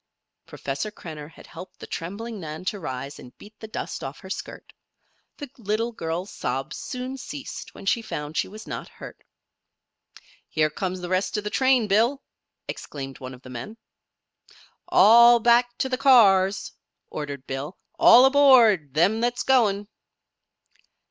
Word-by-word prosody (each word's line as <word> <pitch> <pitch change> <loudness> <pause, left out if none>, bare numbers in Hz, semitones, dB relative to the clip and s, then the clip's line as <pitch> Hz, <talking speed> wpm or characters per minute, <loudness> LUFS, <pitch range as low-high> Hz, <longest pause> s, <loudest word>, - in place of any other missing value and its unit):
Professor 140 +10 -4
Krenner 155 -7 -10
had - - -16
helped 185 - -12
the - - -8
trembling 205 +6 -6
Nan 160 +1 -7
to 205 +1 -2
rise 135 -3 -6
and 125 - -14
beat 210 - -14
the 220 - -8
dust 215 - -6
off - - -7
her - - -10
skirt. - - -8 0.6
The 290 - -7
little 225 +2 -1
girl's 175 -2 -4
sobs 135 +4 -4
soon 255 +1 -6
ceased 275 +1 -8
when - - -11
she 230 +4 +1
found 150 -7 -6
she - - 0
was 215 +3 -11
not - - -6
hurt. - - -12 1.3
"Here 155 -1 +1
comes 185 +3 -4
the 175 - -6
rest 185 +3 0
of 210 - -3
the 210 - -4
train, 260 -3 +3
Bill!" 230 +7 +1 0.4
exclaimed 135 -2 -7
one 130 0 -8
of 125 - -20
the 130 - -11
men. 130 - -8 1.1
"All 235 +2 +7
back 240 +1 +3
to - - -1
the 255 -1 -2
cars!" 200 -7 +4 0.4
ordered 140 -3 -6
Bill. 140 +6 -6 0.2
"All 245 +3 +8
aboard 240 - +5
them 195 +8 +3
that's 245 +1 0
goin'!" 210 -6 +2
205 Hz, 155 wpm, -24 LUFS, 155-235 Hz, 1.3 s, All